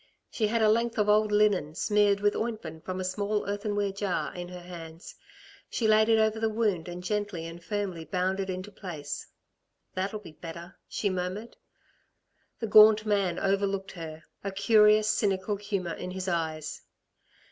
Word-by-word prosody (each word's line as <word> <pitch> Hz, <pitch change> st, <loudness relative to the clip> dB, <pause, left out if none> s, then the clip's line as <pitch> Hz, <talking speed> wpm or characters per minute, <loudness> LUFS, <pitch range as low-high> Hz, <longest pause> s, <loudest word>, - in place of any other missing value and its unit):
She 215 Hz, -, +1 dB
had 225 Hz, +1 st, +1 dB
a -, -, +6 dB
length 230 Hz, +1 st, +1 dB
of 210 Hz, -1 st, +2 dB
old 210 Hz, 0 st, +4 dB
linen, 205 Hz, -8 st, +2 dB
smeared 205 Hz, 0 st, +2 dB
with 205 Hz, 0 st, +2 dB
ointment 195 Hz, -9 st, -4 dB
from 185 Hz, 0 st, -4 dB
a -, -, -2 dB
small 205 Hz, +3 st, -1 dB
earthenware 205 Hz, 0 st, -1 dB
jar, 195 Hz, -2 st, -2 dB
in 175 Hz, 0 st, -6 dB
her 180 Hz, 0 st, -8 dB
hands. 170 Hz, -1 st, -10 dB, 0.6 s
She 225 Hz, -, 0 dB
laid 215 Hz, +1 st, +5 dB
it 225 Hz, -, +5 dB
over 220 Hz, 0 st, +2 dB
the 225 Hz, 0 st, +1 dB
wound 210 Hz, -6 st, 0 dB
and 175 Hz, 0 st, -7 dB
gently 205 Hz, -4 st, -2 dB
and 165 Hz, +1 st, -9 dB
firmly 195 Hz, -6 st, -3 dB
bound 185 Hz, +4 st, -1 dB
it 195 Hz, -1 st, -2 dB
into 185 Hz, +2 st, -5 dB
place. 155 Hz, -8 st, -6 dB, 0.7 s
"That'll 195 Hz, +3 st, -2 dB
be 205 Hz, -6 st, -11 dB
better," 170 Hz, +3 st, -9 dB
she 200 Hz, -, -1 dB
murmured. 185 Hz, +5 st, -4 dB, 1.0 s
The 230 Hz, -, -2 dB
gaunt 215 Hz, 0 st, +7 dB
man 200 Hz, -5 st, +1 dB
overlooked 195 Hz, 0 st, 0 dB
her, 160 Hz, -2 st, -8 dB, 0.2 s
a 195 Hz, -, -2 dB
curious 210 Hz, +1 st, +5 dB
cynical 205 Hz, -1 st, +1 dB
humour 200 Hz, -4 st, -3 dB
in 180 Hz, -, -6 dB
his 185 Hz, 0 st, -5 dB
eyes. 160 Hz, -3 st, -2 dB
195 Hz, 170 wpm, -28 LUFS, 180-210 Hz, 1.0 s, gaunt